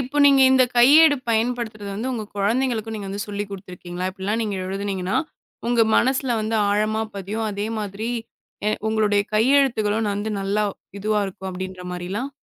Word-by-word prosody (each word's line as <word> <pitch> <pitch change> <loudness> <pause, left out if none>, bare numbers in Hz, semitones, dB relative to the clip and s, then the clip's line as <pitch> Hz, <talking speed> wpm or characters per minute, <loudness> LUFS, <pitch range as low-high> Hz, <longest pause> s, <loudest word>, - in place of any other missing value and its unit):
இப்ப 265 +3 -3
நீங்க 275 -1 +6
இந்தக் 255 -2 +4
கையேடு 290 +4 +7
பயன்படுத்துறது 225 -2 -1
வந்து, 235 +6 -3
உங்க 220 -3 -3
குழந்தைகளுக்கும் 225 +1 0
நீங்க 200 -2 -6
வந்து 200 +1 -4
சொல்லிக் 205 0 -4
குடுத்துருக்கீங்களா? 185 -2 -6
இப்டி 190 0 -13
எல்லாம் 215 +3 0
நீங்க 210 -3 -2
எழுதுனீங்கன்னா 190 -1 -2 0.5
உங்க 240 -1 +4
மனசுல 260 -1 +2
வந்து 220 +1 -1
ஆழமா 215 +2 +1
பதியும். 205 +3 -3
அதே 205 +1 -3
மாதிரி 210 +2 -4 0.8
உங்களுடைய 210 -2 +2
கையெழுத்துகளும் 225 -4 +3
வந்து, 205 +2 -3
நல்லா 200 +2 0 0.4
இதுவா 210 +1 +1
இருக்கும் 190 0 -7
அப்படீன்ற 185 0 -6
மாரில்லாம்? 190 +9 -4
215 Hz, 150 wpm, -23 LUFS, 200-235 Hz, 0.8 s, கையேடு